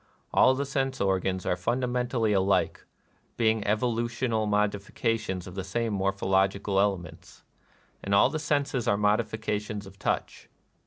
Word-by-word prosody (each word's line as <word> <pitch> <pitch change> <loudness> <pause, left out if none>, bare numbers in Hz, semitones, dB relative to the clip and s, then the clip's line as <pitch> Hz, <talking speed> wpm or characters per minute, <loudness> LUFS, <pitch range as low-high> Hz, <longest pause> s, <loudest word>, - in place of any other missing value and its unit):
All 130 +1 +5
the 140 +2 -2
sense 135 -1 -2
organs 95 -1 0
are - - +1
fundamentally 120 +2 0
alike, 100 0 +1 0.5
being 110 -1 +2
evolu 115 +3 0
tional 115 -2 -1
modifications 105 -1 -1
of 90 - -9
the 95 0 -4
same 115 +4 -2
morphological 95 0 +1
elements; 90 -5 -3 0.3
— - - -35
and 100 0 +1
all - - +5
the 155 - -2
senses 145 -5 -1
are 100 - +3
modifica 105 0 0
tions 105 -1 -6
of 95 0 -14
touch. - - -3
105 Hz, 145 wpm, -27 LUFS, 95-120 Hz, 0.5 s, All